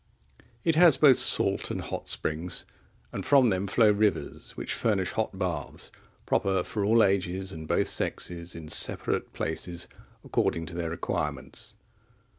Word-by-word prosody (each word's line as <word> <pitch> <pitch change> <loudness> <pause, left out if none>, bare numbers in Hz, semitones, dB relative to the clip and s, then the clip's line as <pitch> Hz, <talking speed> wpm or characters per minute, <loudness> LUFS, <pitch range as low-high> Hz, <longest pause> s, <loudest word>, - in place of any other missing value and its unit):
It 165 - +2
has 165 -2 +6
both 140 -4 +6
salt - - +4
and - - -3
hot - - -6
springs, 80 +3 -2 0.5
and - - -5
from 135 -5 +4
them 95 +1 -1
flow 105 +2 +4
rivers 105 0 -1
which - - -3
furnish 95 -5 0
hot 110 -3 -3
baths, 85 -7 -3 0.3
proper 95 -2 +1
for 105 +2 -3
all 110 +2 +4
ages 95 0 0
and 80 -3 -8
both - - +1
sexes, 85 0 -3
in 80 -2 -8
separate - - 0
places, 85 +2 -3 0.4
according 80 - -1
to 85 - -8
their 85 -1 -3
requirements. 75 -4 -4
95 Hz, 145 wpm, -27 LUFS, 85-110 Hz, 0.5 s, has